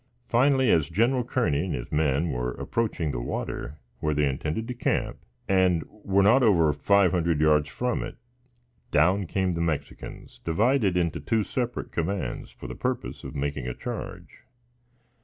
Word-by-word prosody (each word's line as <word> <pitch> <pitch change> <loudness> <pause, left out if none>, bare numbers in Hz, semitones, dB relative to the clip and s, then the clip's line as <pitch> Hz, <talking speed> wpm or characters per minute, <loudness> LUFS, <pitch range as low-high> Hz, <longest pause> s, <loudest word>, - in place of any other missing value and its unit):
Finally, 130 0 +3
as 80 -2 +3
Gen. 120 +8 +2
Kearney 90 - +1
and 95 - -2
his - - -6
men 75 +1 +1
were 60 -1 -2
approaching 105 -9 -2
the 60 - -3
water, 70 +4 -4 0.2
where 75 -1 0
they, 75 0 +2
intended 75 +11 -2
to 125 - -3
camp, 120 - -1 0.3
and 95 -4 +3
were 100 -2 0
not 120 +7 +6
over 85 - +4
five 95 +6 +3
hundred 85 -4 +1
yards 75 -1 +3
from 125 - -1
it, - - -6 0.7
down 90 +6 +3
came 95 0 0
the 85 - -2
Mexicans, 75 -4 -4
divided 105 +2 +2
into 85 -2 0
two 110 +9 0
separate 120 +2 -3
commands, 85 -6 -3
for - - -13
the 65 - -5
purpose - - -3
of - - -8
making 70 -2 -2
a 65 - -3
charge. - - -7
85 Hz, 160 wpm, -26 LUFS, 75-105 Hz, 0.7 s, not